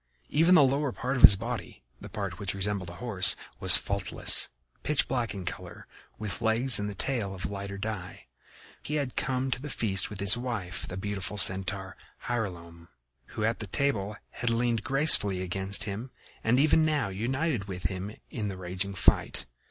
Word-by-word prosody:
Even 165 +5 +4
the 150 - +7
lower 140 +1 0
part 130 +3 -3
of 125 - -2
his 100 - +10
body, 65 -8 -7 0.2
the - - -10
part 100 -4 -5
which 100 -1 -3
resembled 100 -2 -1
a 85 - -10
horse, 105 -6 +1 0.2
was 90 -4 +9
faultless, 100 +2 +3 0.3
pitch 150 -1 +1
black 120 -5 -2
in 95 -2 -7
color, - - -8 0.3
with 105 -4 -6
legs 115 +3 +4
and 105 -1 -5
tail 115 -8 -2
of 95 -2 -5
lighter 100 0 -6
dye. 100 -3 -7 0.6
He 150 - -5
had 140 -4 -3
come 130 0 -2
to 125 - -2
the 150 - -7
feast 100 -7 -1
with 105 -2 -9
his 100 +3 +4
wife, 115 -7 -5
the 90 - -7
beautiful 100 +1 -4
Centaur, 95 +1 +2 0.3
Hylonome, 85 -8 -5 0.5
who 110 - -3
at 115 +1 -1
the 110 - -5
table 105 -3 -2 0.2
had 120 - -2
leaned 115 -1 0
gracefully 135 -9 +4
against 95 +2 -2
him 110 +5 -6 0.3
and 120 +3 +2
even 155 +2 +4
now 150 -8 0
united 125 - -2
with 95 -2 -8
him 95 +2 -4 0.2
in 110 -4 -4
the 95 -2 -6
raging 95 +2 -3
fight. 85 - +1
105 Hz, 175 wpm, -28 LUFS, 95-125 Hz, 0.6 s, his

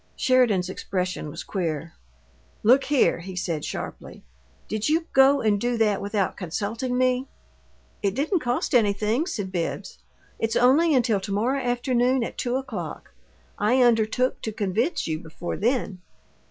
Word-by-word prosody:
Sheridan's 240 -8 +3
expression 185 -3 -3
was - - -7
queer. 165 -4 -3 0.7
"Look 255 +5 +5
here!" 280 -10 +2
he 185 +2 -8
said, 170 -4 -2
sharply. - - -7 0.4
"Did 215 +4 -1
you 325 +2 +2
go 270 +1 +5
and 205 -2 +1
do 240 0 0
that 210 -3 +2
without 200 -1 -1
consulting 215 +8 -3
me?" 255 +1 +1 0.7
"It 200 -2 0
didn't 315 - +1
cost 245 -3 -1
anything," 220 - +2
said 205 - -4
Bibbs. 170 -3 -4 0.4
"It's 225 0 -1
only 285 +6 +4
until 235 -5 +2
to 195 - -6
morrow 245 +7 0
afternoon 245 0 +1
at - - -5
two 245 0 -1
o'clock. 260 -4 -5 0.5
I 245 +5 +3
undertook 240 +2 +2
to 220 - -3
convince 220 - -1
you 155 -1 -2
before 165 +1 -6
then." 220 -5 -1
225 Hz, 145 wpm, -25 LUFS, 195-255 Hz, 0.7 s, Look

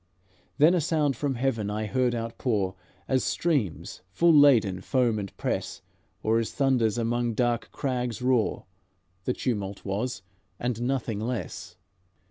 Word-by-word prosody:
Then 155 +4 +6
a 180 - +2
sound 150 -3 +1
from 140 +2 -1
heaven 115 -5 -1
I 105 +1 -2
heard 125 +2 +1
outpour, 115 -4 -1 0.3
As 130 -1 +1
streams, 140 - -1
full 170 - +4
laden, 120 -11 +5
foam 120 -2 +1
and 100 -1 -5
press, - - -3 0.4
Or 110 +1 +3
as 115 - -2
thunders 125 -6 +2
among 120 0 0
dark 120 -2 0
crags 125 -4 -2
roar, 125 -3 +1 0.6
The 125 - +1
tumult 100 -7 -3
was, 100 +2 -3 0.4
and 120 -1 -2
nothing 120 -4 -1
less." 110 -6 -5
120 Hz, 135 wpm, -27 LUFS, 110-130 Hz, 0.6 s, Then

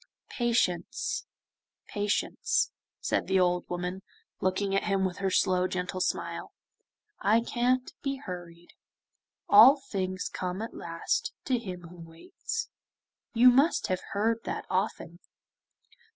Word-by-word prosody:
'Patience, 235 - 0 0.6
patience,' 210 - 0 0.3
said - - 0
the 190 0 +3
old 180 -1 +1
woman 180 +1 -3 0.4
looking 190 +1 0
at 195 - +1
him 195 -2 +1
with 185 -1 -3
her 195 -1 0
slow 185 -1 +2
gentle 185 0 -3
smile, - - -2 0.7
'I 215 +4 +4
can't 250 +2 0
be 275 -1 -1
hurried. 175 -8 -9 0.7
"All 245 +8 +9
things 185 -8 -3
come 180 +1 -4
at 225 - -6
last 165 0 -2
to 255 -3 +1
him 185 -5 -7
who 180 - -13
waits;" 370 - -6 0.7
you 250 +2 +8
must 275 +7 +3
have 185 0 0
heard 225 +3 +1
that - - -4
often. 185 -3 -2
195 Hz, 125 wpm, -29 LUFS, 180-240 Hz, 0.7 s, All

